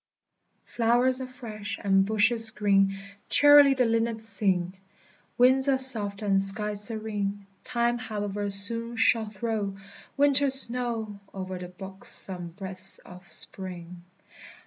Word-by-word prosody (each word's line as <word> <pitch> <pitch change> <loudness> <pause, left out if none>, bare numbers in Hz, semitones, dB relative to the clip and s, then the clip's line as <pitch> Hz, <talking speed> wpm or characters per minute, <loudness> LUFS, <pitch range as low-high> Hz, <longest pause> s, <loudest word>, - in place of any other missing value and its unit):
Flowers 245 +2 0
are 260 - -6
fresh, 220 -4 -8
and 195 -1 +2
bushes 220 +2 +1
green, 195 -2 +1 0.3
Cheerily 290 -1 +6
the 255 -1 +1
linnets 225 -1 -1
sing; 185 -4 0 0.6
Winds 260 +2 +3
are 270 - +2
soft, 220 -6 -2
and 195 -2 +1
skies 210 +1 +2
serene; 205 -3 -3 0.2
Time, 240 0 -2
however, 205 -3 -5
soon 230 +4 0
shall 225 -1 +1
throw 210 -2 -4 0.4
Winter's 280 -1 +4
snow 235 -4 +1 0.2
O'er 185 -1 -6
the 180 - -8
buxom 190 -1 -2
breast 190 +1 +2
of 180 -1 -15
Spring! 180 -2 -8
215 Hz, 120 wpm, -25 LUFS, 195-235 Hz, 0.6 s, Cheerily